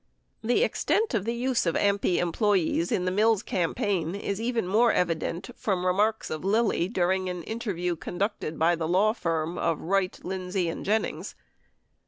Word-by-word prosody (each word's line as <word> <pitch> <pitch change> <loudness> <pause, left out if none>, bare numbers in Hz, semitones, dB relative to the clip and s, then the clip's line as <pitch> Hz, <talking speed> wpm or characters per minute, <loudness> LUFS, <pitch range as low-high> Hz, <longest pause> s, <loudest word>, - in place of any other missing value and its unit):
The 245 - +2
extent 440 - 0
of 205 -4 0
the 230 +1 -1
use 245 -4 0
of 165 - +1
AMPI 200 -3 +2
employees 175 -2 +1
in 180 - 0
the 185 - +1
Mills 215 +1 +3
campaign 175 0 -1
is 200 +1 -3
even 230 -3 0
more 225 +5 +4
evident 170 +4 -1
from 185 -4 -1
remarks 210 +5 +1
of 155 - -4
Lilly 205 -3 +2
during 185 -2 0
an 180 -2 -5
interview 185 -6 -2
con 165 +3 -7
ducted 195 -6 -2
by 170 +2 +3
the 160 -1 -3
law 195 +5 +3
firm 165 -4 -2
of 165 -2 0
Wright, 190 +1 0
Lindsey 185 -1 -2
and - - -5
Jennings. 220 +2 -1
190 Hz, 170 wpm, -27 LUFS, 175-215 Hz, -, more